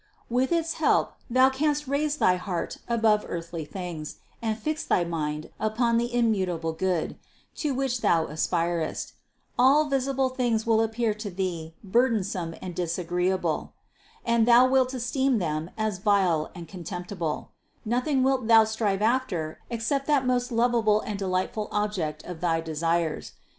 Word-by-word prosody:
With 255 +4 +1
its 330 -1 +1
help - - +3 0.2
thou 255 +2 +5
canst 295 +1 0
raise 290 +2 0
thy 185 -10 +4
heart 180 -1 -4
above 220 -3 +3
earthly 170 -2 -5
things 170 -3 -6 0.3
and 220 -2 -1
fix 305 +7 -2
thy 175 - +2
mind 155 -2 -3
upon 230 +2 +1
the 240 +1 -2
immutable 190 -9 0
Good, 180 -1 -1 0.4
to 290 -4 -1
which 255 -2 -1
thou 165 -1 +3
aspirest; 165 +1 -1 0.5
all 280 +4 +5
visible 270 0 +1
things 240 -4 0
will 225 -1 +3
appear 225 0 0
to 210 0 -6
thee 175 -4 -4
burdensome 200 -6 0
and 180 -1 -5
dis 170 -1 -2
agreeable, 180 +1 -1 0.5
and 235 -1 +3
thou 245 +1 +7
wilt 260 0 +2
esteem 255 +1 +1
them 160 -3 -2
as 215 -4 -1
vile 185 -6 +2
and 170 -2 -8
con 180 +1 -9
temptible; 175 -2 -4 0.4
nothing 255 +4 +1
wilt 260 -3 +1
thou 225 -1 +8
strive 215 -2 -1
after 215 -10 0
except 240 +4 -1
that 285 -3 +3
most 250 0 0
lovable 230 -2 +3
and 210 -2 -5
delightful 190 +2 -1
object 185 -8 -2
of 175 -2 -8
thy 165 -2 +1
desires. 165 0 -1
215 Hz, 150 wpm, -26 LUFS, 175-245 Hz, 0.5 s, thou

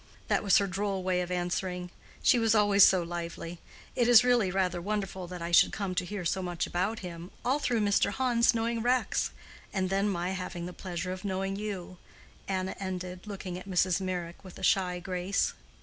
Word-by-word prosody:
That - - +3
was 200 -3 +5
her 200 - +3
droll 195 0 -2
way 180 -1 +1
of 180 - -4
answering: 180 0 -2 0.3
she 245 - +5
was 225 -1 +3
always 205 -2 +6
so 185 -2 +6
lively. 170 0 -6 0.4
It 240 - +2
is 245 -1 +8
really 245 -6 +3
rather 180 -2 0
wonderful 195 -2 -3
that 180 -1 -7
I 170 - -3
should 170 - +6
come 200 -3 -3
to 180 0 -1
hear 195 -1 -5
so 190 +3 0
much 175 -2 -2
about 195 +6 -1
him, 170 0 -7 0.2
all 265 +4 +2
through 240 -6 +1
Mr. 205 -1 +3
Hans 245 -2 +3
knowing 230 0 0
Rex, 250 +2 +1 0.4
and 185 -1 -1
then 195 +1 +2
my 180 -1 -1
having 180 -2 -4
the 180 - -6
pleasure 180 -1 -4
of 185 +1 -6
knowing 195 0 -2
you," 195 -4 -5 0.5
Anna 190 -1 -2
ended, 185 0 -5
looking 185 -3 -5
at 185 - -11
Mrs. 185 0 +2
Meyrick 180 -2 -4
with 185 -2 -11
a 190 - -10
shy 185 -2 +2
grace. 180 +2 -1
185 Hz, 195 wpm, -29 LUFS, 180-205 Hz, 0.5 s, is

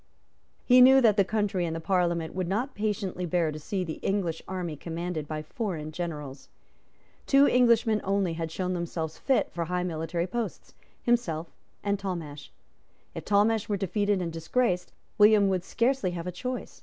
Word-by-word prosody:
He 250 0 +7
knew 265 +1 +8
that 225 -5 +4
the 200 - +4
country 200 -2 -1
and 165 -1 -2
the - - -3
Parliament 170 -2 0
would 185 -1 -2
not 235 +9 -1
patiently 205 -3 -2
bear 165 -2 +1
to 155 - -7
see 185 +5 -3
the 160 -3 -6
English 185 -5 -1
army 180 -4 -4
commanded 165 0 -4
by 155 0 -4
foreign 160 -4 -4
generals. 150 -5 -6 0.8
Two 275 0 +6
Englishmen 235 -3 +3
only 195 -3 0
had 165 -1 -4
shown 185 +1 -2
themselves 165 -2 -4
fit 270 - +1
for 170 -1 -3
high 180 +1 -1
military 170 0 -2
posts, 230 +5 -5 0.3
himself 175 -10 0 0.3
and 200 -1 0
Talmash. 165 -7 -5 0.6
If - - -7
Talmash 210 +1 +2
were 205 - +1
defeated 200 0 0
and 165 -1 -4
disgraced, 180 +3 0 0.3
William 210 -1 +6
would 185 -2 0
scarcely 235 -1 0
have 170 -1 -5
a 180 - -3
choice. 250 +7 -6
185 Hz, 170 wpm, -27 LUFS, 165-210 Hz, 0.8 s, knew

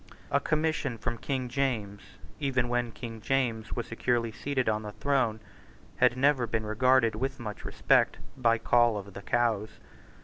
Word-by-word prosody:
A 140 - +4
commission 155 -4 0
from 115 +1 -3
King 130 -3 -2
James, 120 -6 -2 0.4
even 130 -4 0
when 120 -1 0
King 115 -1 -8
James 115 -3 0
was 120 - -2
securely 115 0 0
seated 130 +3 -2
on 110 0 +1
the 105 -1 -7
throne, 130 -6 0 0.6
had 125 - +4
never 135 -2 +3
been 110 -1 -1
regarded 115 +2 +3
with 135 +5 -3
much 105 -3 -6
respect - - +2 0.2
by 115 -3 +3
Coll 120 -1 +3
of 100 -1 -8
the 100 - -8
Cows. 110 -2 0
120 Hz, 160 wpm, -29 LUFS, 110-130 Hz, 0.6 s, A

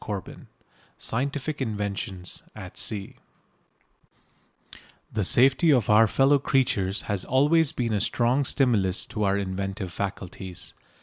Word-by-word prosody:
CHAPTER 100 -4 -5
VI - - -14 0.6
SCIENTIFIC 140 +4 -3
INVENTIONS 100 -5 -4
AT - - -9
SEA 100 -3 -3 2.0
The 105 - 0
safety 135 - +4
of 120 -8 +3
our 110 +2 +6
fellow 135 +5 +3
creatures 105 -8 0
has 100 -3 -2
always 145 +4 +3
been 115 -3 -2
a 105 - 0
strong 125 +6 +1
stimulus 110 -9 +2
to 105 - -4
our 100 0 +2
inventive 95 -1 -4
faculties. 95 -2 -6
105 Hz, 120 wpm, -26 LUFS, 95-135 Hz, 2.0 s, our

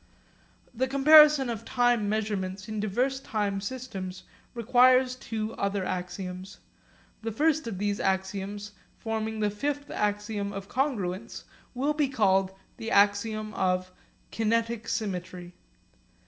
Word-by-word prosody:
The 255 +2 0
comparison 295 0 +7
of 230 -3 -4
time 245 -4 +1
measurements 200 -2 -2
in 215 -1 -4
diverse 245 +6 0
time 205 -6 -2
systems 200 -6 -6 0.3
requires 255 +2 +4
two 225 -3 -4
other 200 -1 -1
axioms. 180 +1 -5 0.6
The 225 0 -3
first 310 +4 +1
of 210 -5 -4
these 205 +1 -1
axioms, 195 +2 -2 0.3
forming 220 -1 -3
the 210 -1 +1
fifth 285 +7 -3
axiom 205 0 -2
of 195 0 -6
congruence, 225 -7 -2 0.3
will 280 +4 +1
be 295 -2 +1
called 195 -6 +2 0.3
the 225 - -5
axiom 215 +1 +2
of 185 -1 0 0.4
'kinetic 230 0 0
symmetry.' 180 -3 -4
215 Hz, 120 wpm, -28 LUFS, 195-245 Hz, 0.6 s, comparison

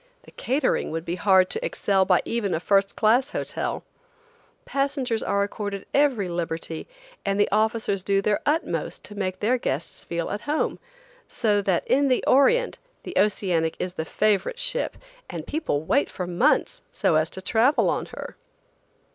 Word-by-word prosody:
The - - -16
catering 270 +4 0
would 165 +1 -4
be 170 - -2
hard 185 +1 +4
to - - -2
excel 195 -2 +1
by 180 -2 +3
even 210 -6 -1
a - - -1
first 195 +2 +2
class 240 +6 +3
hotel. - - -3 0.8
Passengers 275 -5 -1
are 200 0 +1
accorded 200 -1 -4
every 270 -9 +2
liberty, 165 -2 -4 0.4
and 195 +1 0
the 205 - +4
officers 215 -2 +1
do 195 +1 +1
their 205 +1 +1
utmost 310 +3 -1
to - - -8
make 185 -2 -3
their 245 +4 +2
guests 150 - -3
feel 170 -1 -3
at 205 - -3
home, 300 +2 -1 0.5
so 210 -4 +1
that 190 -3 0
in 280 +1 +3
the 255 -2 +2
Orient 470 - +3 0.2
the 360 - -7
Oceanic 180 -5 +1
is 180 - -3
the 160 - -3
favorite 215 - 0
ship, - - -1 0.3
and - - -6
people 295 - -2
wait 275 - +2
for 180 - -5
months 180 - +1
so - - +1
as 155 +1 +2
to - - -7
travel 230 +9 +3
on - - -1
her. - - -8
205 Hz, 165 wpm, -25 LUFS, 185-255 Hz, 0.8 s, hard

